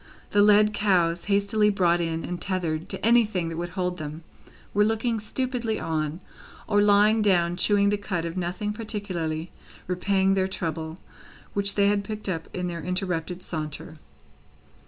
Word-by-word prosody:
The 205 - +4
led 210 +1 +5
cows, 175 -5 +2
hastily 205 +1 +2
brought 175 -4 +2
in 165 -1 -2
and 175 0 -5
tethered 170 -4 -2
to - - -4
anything 215 -7 +3
that 165 - -5
would 175 +1 -3
hold 180 -1 -1
them, 155 +2 -6 0.5
were 205 - +4
looking 225 +1 0
stupidly 240 0 -2
on, 155 +1 -2 0.5
or 205 -1 +3
lying 210 +2 +5
down 175 -4 +3
chewing 200 +2 +3
the 205 - 0
cud 180 -5 -3
of 165 +1 -4
nothing 185 +4 -2
particularly 185 -7 -4 0.3
repaying 190 +1 +1
their 190 -1 +1
trouble, 160 -3 -4 0.6
which 200 0 +2
they 200 - +4
had 200 0 +2
picked 215 +1 -6
up 165 -4 -3
in 180 -1 -3
their 170 -1 -4
interrupted 180 0 -2
saunter. 155 -1 -5
185 Hz, 155 wpm, -26 LUFS, 170-205 Hz, 0.6 s, led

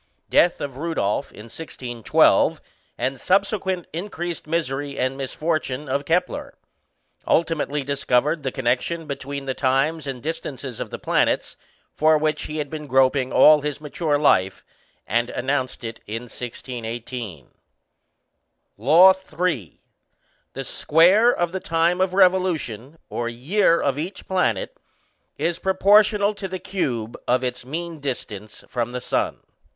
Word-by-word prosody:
Death 175 - +4
of 140 -3 -5
Rudolph 140 -6 -1
in 105 - -11
1612, 120 -2 +1 0.4
and 130 -1 -2
subsequent 190 -2 +1
increased 175 -2 -5
misery 145 -3 -2
and 130 +1 0
misfortune 145 0 -2
of 140 +2 -1
Kepler. 175 +4 -1 0.7
Ultimately 150 -3 +1
discovered 140 +2 +1
the 135 -2 -2
connection 130 +6 -1
between 140 -1 -5
the 135 - -1
times 140 +4 0
and 130 -3 -5
distances 135 -6 -5
of - - -4
the - - -6
planets - - 0 0.4
for 155 0 +4
which 155 0 -1
he 155 - -5
had 150 -1 -2
been 150 0 -7
groping 130 0 +3
all 150 -1 +7
his 145 -1 -3
mature 150 0 -1
life, 95 -10 +2 0.4
and 120 +4 0
announced 130 -1 -2
it 115 0 -6
in 115 +3 -4
1618: 120 - -7 1.3
LAW 160 - +7
III. 180 - -3 0.8
_The 135 0 -4
square 185 - +4
of 175 -7 -1
the 190 - -3
time 170 +2 +1
of 185 0 +1
revolution 175 - +1
(or 120 0 -2
year) 165 - +2
of 140 0 0
each 175 +6 -5
planet 190 - 0 0.6
is 170 0 -1
proportional 205 +2 +4
to 200 -2 -5
the 185 0 -4
cube 125 - -3
of 125 +1 +2
its 125 0 -3
mean 165 +4 -5
distance 110 -7 -6
from 120 -1 -3
the 125 - -2
sun. - - -1
145 Hz, 135 wpm, -23 LUFS, 125-170 Hz, 1.3 s, all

